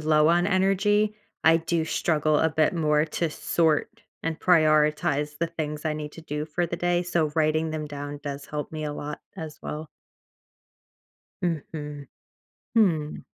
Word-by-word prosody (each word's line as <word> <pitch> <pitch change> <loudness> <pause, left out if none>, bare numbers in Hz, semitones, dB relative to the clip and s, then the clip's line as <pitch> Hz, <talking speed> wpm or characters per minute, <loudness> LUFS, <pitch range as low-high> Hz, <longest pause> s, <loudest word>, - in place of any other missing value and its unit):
low 155 0 +4
on 175 +1 +4
energy, 205 +2 +2 0.3
I 165 +1 +6
do 165 0 0
struggle 155 -2 +1
a 160 - +3
bit 155 0 +2
more 150 -2 +2
to 165 +1 -1
sort 155 0 0 0.2
and 165 -1 -3
prioritize 150 -2 +3
the 170 0 0
things 150 -2 -4
I 155 - +1
need 150 -1 -5
to 165 - -11
do 150 -1 -4
for 170 +3 -1
the 170 - -4
day. 175 0 +1
So, 170 -4 0
writing 155 0 +2
them 155 -1 -3
down 145 0 -6
does 140 -1 -5
help 150 0 -5
me 155 -1 -4
a 150 - -2
lot 145 0 -5 0.2
as 155 -2 -7
well. 155 +1 -5 1.5
Mhm. 150 -4 -4 0.7
Hmm. 165 -9 +2
155 Hz, 155 wpm, -26 LUFS, 150-170 Hz, 1.5 s, I